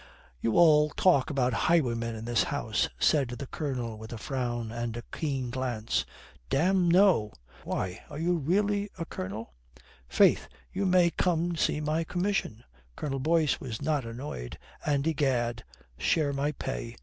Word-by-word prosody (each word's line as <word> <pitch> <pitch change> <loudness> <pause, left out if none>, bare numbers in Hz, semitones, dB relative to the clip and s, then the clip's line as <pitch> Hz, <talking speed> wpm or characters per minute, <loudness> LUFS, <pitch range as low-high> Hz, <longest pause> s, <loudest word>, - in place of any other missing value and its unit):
"You 115 - +1
all 150 -3 +6
talk 150 -5 +3
about 130 -4 +1 0.2
highwaymen 115 -8 +1
in 110 0 -7
this 120 -2 +2
house," - - -1
said 140 -4 +3
the 125 +3 -6
Colonel 125 -7 -4
with 110 0 -9
a 120 - -5
frown 120 -2 -3
and 120 0 -4
a 120 - -6
keen 135 -6 -2
glance. 120 -4 -1 0.4
"Damme, 180 +4 +3
no." 175 - +4 0.3
"Why, 95 0 -3
are 145 - -7
you 175 +3 +1
really 200 +6 +1
a 165 - -3
colonel?" 100 - -6 0.5
"Faith, - - +4 0.3
you 195 +1 0
may 180 -2 +4
come 175 -1 0
see 150 - +1
my 155 +2 0
commission," 175 - -2 0.3
Colonel 135 -2 -3
Boyce 155 +1 +2
was 115 -4 -5
not 145 -1 0
annoyed, 115 - -6 0.3
"and, 140 -1 +1
egad, 125 -7 0 0.4
share 150 -4 +1
my 140 +2 0
pay." 120 -4 -5
140 Hz, 150 wpm, -29 LUFS, 120-165 Hz, 0.5 s, all